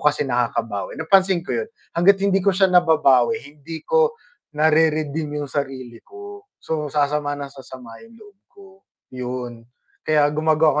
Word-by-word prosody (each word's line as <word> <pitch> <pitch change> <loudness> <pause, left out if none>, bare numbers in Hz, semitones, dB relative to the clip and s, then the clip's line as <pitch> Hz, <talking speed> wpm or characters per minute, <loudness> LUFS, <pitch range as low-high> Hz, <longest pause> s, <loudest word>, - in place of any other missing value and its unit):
kasi 150 0 +2
nakakabawi, 115 -4 -2
napansin 185 +1 +2
ko - - -3
'yun. 460 -1 -3 0.3
Hangga't 185 +4 +5
hindi 195 -1 +2
ko 200 - +1
siya 190 +1 +2
nababawi, 150 -6 +4 0.2
hindi 160 +2 -8
ko 470 -1 +2 0.4
na-re-redeem 155 -1 +1
'yung 145 -2 -5
sarili 130 -5 -5
ko. 405 0 -12
So, 150 -2 -4
sasama 145 0 -1
nang 140 -1 -7
sasama 130 -4 -12
'yung 230 0 -17
loob 205 -3 -18
ko, 200 - -17 0.5
yun. 125 -2 -6 0.4
Kaya 150 -2 +3
gumagawa 155 -1 +2
150 Hz, 145 wpm, -21 LUFS, 135-185 Hz, 0.5 s, Hangga't